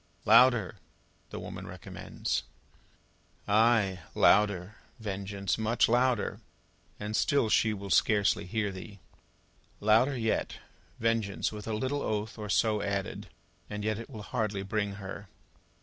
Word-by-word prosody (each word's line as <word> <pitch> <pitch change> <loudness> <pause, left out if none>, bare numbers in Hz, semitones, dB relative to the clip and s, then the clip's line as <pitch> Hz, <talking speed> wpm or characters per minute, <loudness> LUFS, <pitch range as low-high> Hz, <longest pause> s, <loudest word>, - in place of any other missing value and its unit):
"Louder," 115 -3 +5 0.5
the - - -6
woman - - -7
recommends. - - -4 1.1
Ay! 105 -3 +3 0.2
Louder, 100 -1 +3 0.2
Vengeance, 100 -2 -3
much 110 +2 +2
louder, 120 -1 +1 0.6
and 105 +1 -3
still 140 -3 +2
she 110 +1 +3
will 100 -2 -6
scarcely 105 -3 +3
hear 105 +1 -1
thee. 100 +2 -9 0.8
Louder 115 +6 +3
yet, 110 -2 -1 0.4
Vengeance, 115 -3 0
with 105 0 -8
a 110 - -2
little 130 +5 -1
oath 110 +1 -3
or 105 -1 -5
so 105 0 +2
added, 100 -1 -3 0.4
and 105 0 -5
yet 110 0 -1
it 115 - -8
will 110 -6 -8
hardly 105 -2 -2
bring 100 0 -2
her. 100 0 -8
105 Hz, 125 wpm, -30 LUFS, 100-115 Hz, 1.1 s, Louder